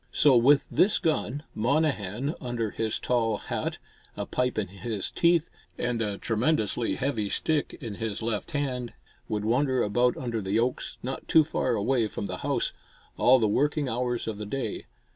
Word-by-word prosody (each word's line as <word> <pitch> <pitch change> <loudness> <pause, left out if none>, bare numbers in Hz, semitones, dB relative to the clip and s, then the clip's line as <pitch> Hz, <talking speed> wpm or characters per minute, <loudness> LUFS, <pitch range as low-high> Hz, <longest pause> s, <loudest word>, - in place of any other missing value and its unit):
So 145 -3 +5
with 135 +4 +5
this 195 - +4
gun, 150 -3 -1
Monnehan, 130 - 0
under 120 -4 -2
his 110 -1 -1
tall 115 -3 +1
hat, - - -3 0.4
a - - -2
pipe 125 0 -1
in 100 -4 -1
his 100 +2 -4
teeth 170 -1 +3 0.3
and 120 -1 -1
a 105 -3 -1
tremendously 115 0 0
heavy 120 -7 -1
stick 155 +5 -1
in 115 -5 -5
his 110 -1 -3
left 110 +3 -2
hand 130 -6 -2 0.3
would 105 -1 -2
wander 130 +2 +2
about 120 +4 +2
under 115 -3 -2
the 95 +2 0
oaks, 125 +2 -1
not 130 +2 -5
too 160 - +6
far 130 -5 0
away 115 +2 +1
from 105 - -5
the 90 -2 -4
house, - - -1 0.4
all 130 +1 +6
the 110 -3 +2
working 145 +6 +1
hours 120 -1 -1
of 110 -2 -4
the 105 - -4
day. 120 -2 -4
120 Hz, 170 wpm, -27 LUFS, 110-135 Hz, 0.4 s, too